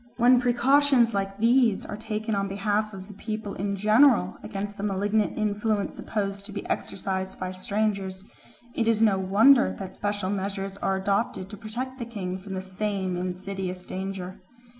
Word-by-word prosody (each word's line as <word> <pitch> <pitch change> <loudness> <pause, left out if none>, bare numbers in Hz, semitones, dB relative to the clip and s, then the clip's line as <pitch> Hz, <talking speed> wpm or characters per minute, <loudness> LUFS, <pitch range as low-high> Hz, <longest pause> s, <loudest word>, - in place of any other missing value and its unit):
When 245 +1 +6
precautions 250 0 +4
like 195 0 -2
these 230 -1 +3
are - - -5
taken 220 +1 -3
on 200 -1 0
behalf 205 +2 0
of 190 -2 -9
the 210 - -10
people 215 0 -5
in 200 +1 -2
general 215 +6 +4
against 205 -1 -5
the - - -5
malignant 205 +1 0
influence 210 0 0
supposed 200 -2 -3
to - - -9
be 200 - -5
exercised 190 0 -3
by 185 0 -3
strangers, 195 0 -2 0.5
it 230 - 0
is 225 -1 +3
no 200 -3 +4
wonder 220 +8 +5
that 190 -2 -7
special 205 -2 -2
measures 195 0 -3
are 195 -1 0
adopted 195 0 -1
to - - -6
protect 250 +6 -5
the 235 - -3
king 190 -5 -4
from 190 0 -7
the 185 - -3
same 190 -1 -2
insidious 185 0 -4
danger. 190 -1 -5
205 Hz, 165 wpm, -26 LUFS, 190-220 Hz, 0.5 s, When